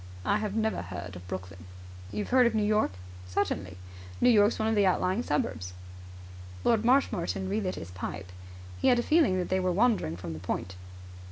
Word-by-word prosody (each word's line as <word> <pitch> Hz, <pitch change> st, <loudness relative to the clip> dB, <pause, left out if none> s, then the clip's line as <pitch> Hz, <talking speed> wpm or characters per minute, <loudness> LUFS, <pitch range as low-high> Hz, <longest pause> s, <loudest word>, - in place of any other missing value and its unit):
"I 205 Hz, -, +2 dB
have 210 Hz, -1 st, -3 dB
never 220 Hz, 0 st, 0 dB
heard 90 Hz, +1 st, -7 dB
of 90 Hz, 0 st, -10 dB
Brooklyn." 90 Hz, -2 st, -7 dB, 0.5 s
"You've 105 Hz, +1 st, -4 dB
heard 250 Hz, -1 st, +6 dB
of 230 Hz, -, -1 dB
New 215 Hz, -, +2 dB
York?" 210 Hz, +1 st, +2 dB, 0.4 s
"Certainly." 90 Hz, 0 st, -2 dB, 0.4 s
"New 245 Hz, -, +5 dB
York's 210 Hz, 0 st, +4 dB
one 220 Hz, -, 0 dB
of 225 Hz, -, +2 dB
the 205 Hz, -2 st, +4 dB
outlying 185 Hz, +3 st, +1 dB
suburbs." 95 Hz, -, -2 dB, 0.9 s
Lord 225 Hz, -2 st, +3 dB
Marshmoreton 230 Hz, -7 st, +1 dB
relit 195 Hz, -1 st, -1 dB
his 85 Hz, -, -8 dB
pipe. 90 Hz, 0 st, -6 dB, 0.5 s
He -, -, +2 dB
had 245 Hz, -, +5 dB
a 240 Hz, -, +1 dB
feeling 305 Hz, -, +3 dB
that 180 Hz, -, -2 dB
they 185 Hz, -, +2 dB
were 185 Hz, -1 st, +1 dB
wandering 200 Hz, -, +2 dB
from 85 Hz, -2 st, -6 dB
the 80 Hz, -, -7 dB
point. 90 Hz, +1 st, -4 dB
185 Hz, 185 wpm, -29 LUFS, -, 0.9 s, heard